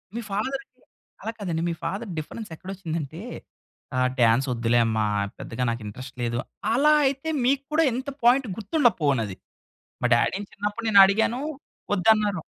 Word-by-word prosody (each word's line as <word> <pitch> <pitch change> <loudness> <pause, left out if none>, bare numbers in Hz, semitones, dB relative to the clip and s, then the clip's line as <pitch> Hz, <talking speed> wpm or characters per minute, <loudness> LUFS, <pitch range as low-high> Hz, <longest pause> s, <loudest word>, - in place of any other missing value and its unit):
మీ 235 - -2
ఫాదర్‌కి 265 +7 -2 0.6
అలా 225 - -3
కాదండి. 170 -5 -2
మీ - - -1
ఫాదర్ 200 +5 -3
డిఫరెన్స్ 205 +8 -6
ఎక్కడ 185 +4 -12
వచ్చిందంటే, 165 -3 -5 0.8
ఆహ్, 130 0 +3
"డాన్స్ 120 +4 +4
వద్దులే 120 0 +2
అమ్మ 110 -1 -1 0.4
పెద్దగా 120 +2 -4
నాకు 115 0 -3
ఇంట్రెస్ట్ 130 +4 -9
లేదు." 120 0 -1 0.3
అలా 295 +5 +5
అయితే 275 +4 -1 0.2
మీకు 275 +1 +2
కూడా 325 +2 +4
ఎంత 260 +3 -3
పాయింట్ 250 +2 +5
గుర్తుండపోవునది. 155 - +1 0.6
మా 125 - +3
డ్యాడీ‌ని 195 +12 0
చిన్నప్పుడు 205 +3 -4
నేను 200 -2 +8
అడిగాను 225 +6 +1 0.5
వద్దన్నారు. 205 -2 +3
195 Hz, 145 wpm, -25 LUFS, -, 0.8 s, నేను